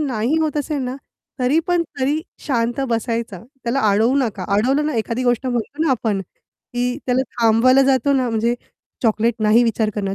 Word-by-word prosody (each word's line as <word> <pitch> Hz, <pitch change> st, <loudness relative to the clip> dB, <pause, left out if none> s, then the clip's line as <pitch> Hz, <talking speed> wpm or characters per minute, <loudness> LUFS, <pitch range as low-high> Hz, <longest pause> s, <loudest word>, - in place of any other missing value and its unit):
नाही 260 Hz, 0 st, 0 dB
होत 310 Hz, -2 st, -1 dB
असेल 295 Hz, 0 st, -2 dB
ना, 255 Hz, +1 st, -4 dB, 0.4 s
तरी 255 Hz, +5 st, +3 dB
पण 350 Hz, -1 st, +2 dB, 0.2 s
तरी 290 Hz, +4 st, +1 dB, 0.3 s
शांत 240 Hz, -2 st, 0 dB
बसायचा. 230 Hz, -3 st, -2 dB, 0.3 s
त्याला 245 Hz, +4 st, 0 dB
अडवू 225 Hz, +6 st, +3 dB
नका, 215 Hz, -8 st, -2 dB
अडवलं 270 Hz, +7 st, +2 dB
ना, 305 Hz, -, -2 dB
एखादी 230 Hz, +3 st, -1 dB
गोष्ट 245 Hz, +1 st, +1 dB
म्हणतो 250 Hz, +5 st, -2 dB
ना 315 Hz, -, +2 dB
आपण, 220 Hz, -6 st, 0 dB, 0.5 s
की 245 Hz, +1 st, 0 dB
त्याला 255 Hz, +1 st, +2 dB, 0.2 s
थांबवायला 235 Hz, +4 st, +5 dB
जातो 270 Hz, 0 st, +2 dB
ना, 260 Hz, -3 st, +1 dB
म्हणजे 230 Hz, +1 st, +1 dB, 0.5 s
चॉकलेट 225 Hz, 0 st, +2 dB
नाही 215 Hz, +3 st, +5 dB
विचार 225 Hz, -2 st, 0 dB
करणं, 195 Hz, -2 st, -2 dB
245 Hz, 170 wpm, -20 LUFS, 225-270 Hz, 0.5 s, थांबवायला